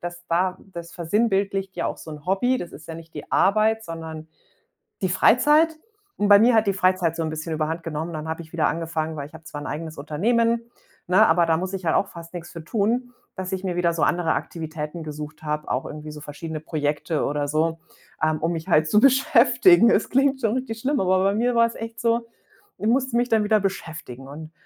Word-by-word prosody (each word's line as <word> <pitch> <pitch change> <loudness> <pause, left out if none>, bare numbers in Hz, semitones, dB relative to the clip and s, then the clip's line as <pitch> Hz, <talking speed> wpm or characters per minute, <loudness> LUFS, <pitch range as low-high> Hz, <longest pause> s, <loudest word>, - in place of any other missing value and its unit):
dass 175 0 -7
da 180 +2 +1 0.2
das 170 -1 -8
versinnbildlicht 195 +1 0
ja - - -1
auch - - -4
so 160 - -10
'n 150 -1 -10
Hobby. 245 +8 +2
Das 175 - -7
ist 160 - -12
ja 165 - -5
nicht 165 0 -13
die - - -8
Arbeit, 220 +3 +3
sondern 160 -1 -7 0.8
die 185 - +2
Freizeit. 300 - +4 0.4
Und 205 - 0
bei 200 0 +9
mir 235 +2 +5
hat 220 0 +4
die 200 - +2
Freizeit 185 -3 +1
so - - -1
'n 160 - -2
bisschen 155 +1 -5
überhand 160 +2 -2
genommen. 160 +1 -4
Dann 155 0 -5
hab 160 - -3
ich 165 0 -11
wieder 160 -2 +2
angefangen 160 -1 -3
weil 140 - -5
ich 150 - -22
hab 160 0 -13
zwar 145 - -7
'n - - -6
eigenes 160 +1 -5
Unternehmen, 230 +11 +1 0.5
ne, 180 +2 +5
aber 170 +1 +4
da 160 -1 +2
muss 185 +3 -4
ich 190 -1 -4
halt 160 - +2
auch 200 - +1
fast 170 -1 -11
nix 170 -1 -7
für 165 -2 -8
tun, 230 +7 0 0.2
dass 185 -1 -5
ich 190 0 -3
mir 180 -2 -2
wieder 175 -1 +1
so 165 - -1
andere 170 -2 +2
Aktivitäten 160 0 -5
gesucht 150 0 -8
habe, 150 0 -3
auch 130 - -1
irgendwie 150 0 -7
so 150 - -10
verschiedene 155 +2 -6
Projekte 150 0 -1
oder 145 0 -1
so, 160 +2 0 0.4
ähm, 155 0 +2
um 165 +1 0
mich 165 -1 -5
halt 155 0 +3
zu 210 - +5
beschäftigen. 260 +2 +5
Es 220 - +2
klingt 270 +1 +2
schon 225 -3 +1
richtig 255 -3 -4
schlimm, 275 +5 0
aber 185 0 +2
bei 195 +1 +2
mir 245 +3 +1
war 230 0 +5
es 230 - -9
echt 225 0 -7
so, 230 0 +1 0.5
ich - - -4
musste 260 0 +1
mich 245 +1 +2
dann 220 -1 +3
wieder 215 0 +3
beschäftigen 160 -9 -5
und, 155 +3 -9
175 Hz, 225 wpm, -24 LUFS, 160-220 Hz, 0.8 s, bei